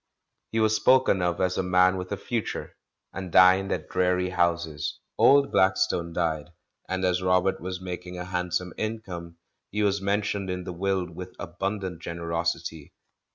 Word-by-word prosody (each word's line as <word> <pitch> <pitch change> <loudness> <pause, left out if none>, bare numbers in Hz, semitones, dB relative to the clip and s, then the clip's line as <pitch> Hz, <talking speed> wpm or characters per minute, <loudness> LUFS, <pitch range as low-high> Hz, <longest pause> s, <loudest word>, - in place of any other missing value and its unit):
He 115 - 0
was 110 0 +3
spoken 130 -6 +4
of 90 0 0
as 90 0 +1
a - - +3
man 90 0 +4
with 90 0 -5
a 100 - -1
future, 115 +2 -4 0.4
and 95 -2 -6
dined 95 +2 +6
at - - -2
dreary 90 0 +1
houses. 85 -4 -1 0.2
Old 140 0 +5
Blackstone 95 -2 +2
died, 80 -3 -1 0.4
and 95 0 -1
as 90 0 +1
Robert 90 +1 +2
was 90 0 -4
making 90 0 -6
a 90 - -5
handsome 90 0 -2
income 90 -7 -5 0.3
he 105 +1 -1
was 100 -1 +1
mentioned 100 0 -1
in 90 0 -3
the 90 - -6
will 95 +1 0
with 90 +2 -9
abimdant 95 0 -4
generosity. 85 -2 -3
90 Hz, 155 wpm, -26 LUFS, 85-95 Hz, 0.4 s, dined